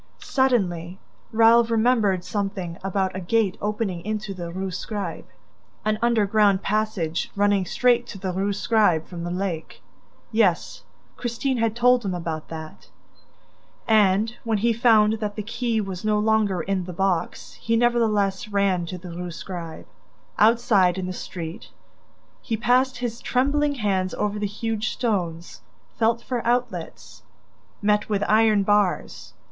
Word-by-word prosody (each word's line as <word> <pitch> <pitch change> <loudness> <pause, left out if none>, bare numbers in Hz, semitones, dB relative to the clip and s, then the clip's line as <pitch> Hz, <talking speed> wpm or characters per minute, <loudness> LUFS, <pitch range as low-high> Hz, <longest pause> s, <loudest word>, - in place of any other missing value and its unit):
Suddenly, 190 - 0 0.3
Raoul 230 +1 +6
remembered 225 -5 +2
something 195 -4 -4
about 190 -1 -1
a - - -3
gate 195 +1 +1
opening 205 -4 -2
into 215 0 -3
the 175 -2 -6
Rue 190 +1 -4
Scribe, 190 -1 -5 0.6
an 215 0 0
underground 210 -4 +3
passage 200 -6 -1
running 205 -2 +2
straight 245 +2 +2
to 205 - -8
the 185 -1 -4
Rue 195 +2 0
Scribe 200 -6 +2
from 170 -2 -7
the 175 - -3
lake... 180 -3 -4 0.5
Yes, 215 -6 +1 0.4
Christine 245 +2 -2
had 225 -1 0
told 245 0 +4
him 190 -3 -2
about 165 -3 -4
that... 160 -1 -9 1.0
And, 215 +1 +3
when 225 -2 0
he 230 +3 +2
found 220 -2 +4
that 210 -1 -3
the 210 - -4
key 230 +1 -1
was 195 -2 -5
no 215 -1 +2
longer 210 -4 +1
in 185 +1 -2
the 180 - -7
box, 190 -1 -1
he 230 - +1
nevertheless 215 -5 +1
ran 200 -4 +1
to 185 - -5
the 180 0 -9
Rue 175 +1 -5
Scribe. 165 +1 -7 0.5
Outside, 210 -5 +4
in 185 - -3
the 185 - -4
street, 170 -2 -7 0.7
he 225 - -2
passed 255 +3 +2
his 240 -2 -4
trembling 285 +3 +1
hands 190 -6 -1
over 210 0 -2
the 205 - -1
huge 220 +2 -3
stones, 175 -8 -3 0.4
felt 230 +1 +2
for 245 -3 -3
outlets... 245 +1 -3 0.6
met 210 +1 +2
with 205 -1 0
iron 215 -1 +4
bars 205 -2 0
205 Hz, 145 wpm, -24 LUFS, 185-225 Hz, 1.0 s, Raoul